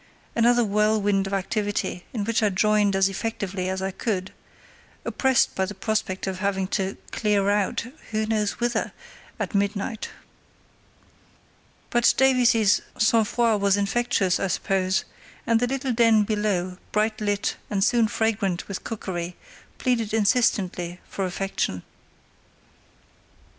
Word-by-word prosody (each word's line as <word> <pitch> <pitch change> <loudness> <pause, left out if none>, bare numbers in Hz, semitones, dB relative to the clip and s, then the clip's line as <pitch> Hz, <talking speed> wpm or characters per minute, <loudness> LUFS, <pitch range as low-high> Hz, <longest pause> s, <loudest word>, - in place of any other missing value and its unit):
Another 240 +1 +4
whirlwind 205 -2 +2
of 195 - -5
activity, 205 -2 -2
in 220 -4 -2
which 230 +2 0
I 210 - +3
joined 205 +1 +2
as 195 0 +4
effectively 195 -2 -3
as 190 0 -2
I 190 - -1
could, 190 -2 -3 0.7
oppressed 265 -2 +2
by 190 - 0
the 205 +2 -7
prospect 195 -1 -2
of 190 -1 -4
having 195 -1 0
to 195 -1 -2
"clear 205 -2 +1
out"—who 215 +2 -2
knows 215 -2 0
whither?—at 240 -1 -4
midnight. 200 +2 -1 1.8
But 240 0 +4
Davies's 245 -6 +4 0.2
sang 220 +1 +4
froid 225 -2 +1
was 200 0 +3
infectious, 200 -2 +1
I 195 - 0
suppose, 190 +1 0 0.4
and 230 -1 +3
the 245 - +1
little 265 0 -1
den 225 -2 +5
below, 200 -4 -1
bright 215 +1 0
lit 205 -1 -1
and 195 -2 +1
soon 230 +1 +3
fragrant 205 -5 -1
with 200 - -5
cookery, 180 -5 -4 0.4
pleaded 230 -4 0
insistently 195 -5 +1
for 195 - -3
affection. 185 - -2
205 Hz, 125 wpm, -24 LUFS, 195-225 Hz, 1.8 s, den